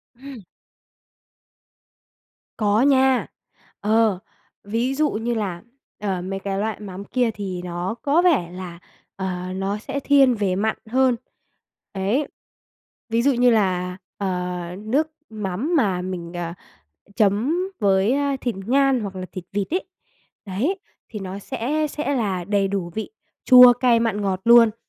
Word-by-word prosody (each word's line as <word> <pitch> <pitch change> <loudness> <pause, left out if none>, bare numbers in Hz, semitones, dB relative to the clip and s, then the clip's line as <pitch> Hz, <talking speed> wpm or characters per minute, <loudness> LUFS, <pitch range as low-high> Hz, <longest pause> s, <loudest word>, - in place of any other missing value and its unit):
Ừm. 265 -2 -10 2.2
Có 210 +1 +2
nha. 265 -2 +4 0.5
Ờ, 215 -2 +2 0.4
ví 230 +6 -1
dụ 300 +1 +2
như 230 +3 -2
là, 195 -6 -3 0.4
ờ, 195 -3 -2
mấy 195 +2 -4
cái 195 0 -3
loại 220 0 -2
mắm 200 -2 -7
kia 245 -1 0
thì 190 -4 -5
nó 180 +3 -4
có 295 +4 +3
vẻ 285 - +2
là, 180 -2 -8 0.4
ờ, 185 -1 -4
nó 195 +2 -2
sẽ 275 +6 -4
thiên 275 -3 +4
về 200 -4 0
mặn 220 +3 0
hơn. 255 0 +3 0.8
Đấy. 210 +9 0 0.8
Ví 230 +1 +2
dụ 280 +3 +3
như 245 0 +4
là, 180 -4 +1 0.2
ờ, 180 -2 -2 0.2
nước 260 +9 0 0.2
mắm 215 - -2
mà 195 -9 +1
mình, 180 -2 -5
ờ, 170 -1 -4 0.6
chấm 220 - +2 0.2
với, 200 +2 +3
ơ, 280 0 0
thịt 240 -3 -2
ngan 270 0 +3
hoặc 195 -2 -5
là 185 - -5
thịt 185 - -7
vịt 205 +8 -2
ấy, 370 - 0 0.6
đấy, 245 - -1 0.3
thì 215 - -6
nó 195 0 -6
sẽ 275 +8 -2
sẽ 285 -1 -2
là 195 -7 -1
đầy 200 0 +1
đủ 190 -3 -3
vị 220 - -3 0.4
chua, 250 -1 +9
cay, 245 -1 +3
mặn, 225 -3 0
ngọt 190 -2 -1
luôn. 230 -2 +7
210 Hz, 145 wpm, -22 LUFS, 190-255 Hz, 2.2 s, chua